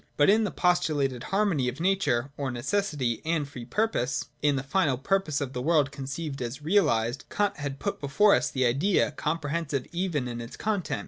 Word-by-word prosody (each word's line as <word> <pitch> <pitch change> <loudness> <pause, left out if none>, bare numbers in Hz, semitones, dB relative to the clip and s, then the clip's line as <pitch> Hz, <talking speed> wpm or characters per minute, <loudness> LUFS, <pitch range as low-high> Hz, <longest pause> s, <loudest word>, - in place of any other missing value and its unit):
But 145 +6 +6
in 220 +1 +3
the - - -1
postulated 145 -9 +1
har 200 +3 +1
mony 150 -11 +1
of 125 +4 -3
nature 170 -9 +1
(or 140 -2 -3
necessity) 130 - -1
and 160 -3 0
free 125 -4 -9
purpose, 130 - -1
— - - -40
in 145 -1 +3
the 135 - -2
final 145 -3 +1
purpose 155 +1 0
of 135 -2 -3
the 125 - -3
world 150 -1 +2
conceived 140 +1 -5
as 125 +4 -5
realised, 130 - +2
Kant 205 0 0
has 145 -2 -3
put - - -3
before 145 +9 +4
us 125 +1 +2
the 130 0 0
Idea, 145 +10 +2
comprehensive 150 -2 -2
even 170 -7 -1
in 120 -1 -5
its 115 +2 -9
content. 205 -4 -1
145 Hz, 195 wpm, -27 LUFS, 130-180 Hz, -, But